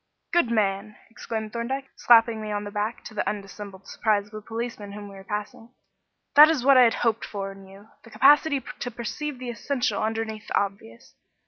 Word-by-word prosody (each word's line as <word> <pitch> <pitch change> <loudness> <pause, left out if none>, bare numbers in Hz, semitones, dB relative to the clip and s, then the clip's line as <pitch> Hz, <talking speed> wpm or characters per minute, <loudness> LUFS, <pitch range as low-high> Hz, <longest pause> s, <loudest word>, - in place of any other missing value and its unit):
"Good 345 -9 +3
man!" 210 -1 0 0.2
exclaimed 220 -1 -5
Thorndyke, 265 +3 -4
slapping 230 -2 +5
me 215 0 -5
on 205 0 -2
the 205 - -7
back, 210 +3 -3
to 220 - -10
the 210 - -1
undissembled 200 -1 -8
surprise 205 -2 0
of - - -27
a 215 - -6
policeman 225 -2 -6
whom 205 0 -8
we - - -12
were 195 - -11
passing; 210 +4 -6 0.6
"that 300 +2 +9
is 290 -6 0
what 275 0 +7
I 255 -1 +8
had 230 - +2
hoped 225 -1 +1
for 195 -1 -5
in 195 0 -13
you 195 +2 -15
the 230 - -16
capacity 285 +2 +4 0.2
to 245 - -3
perceive 250 +5 -5
the 250 -1 -5
essential 240 -2 -1
underneath 220 0 -3
the - - 0
obvious. 195 - -6
220 Hz, 200 wpm, -25 LUFS, 205-240 Hz, 0.6 s, that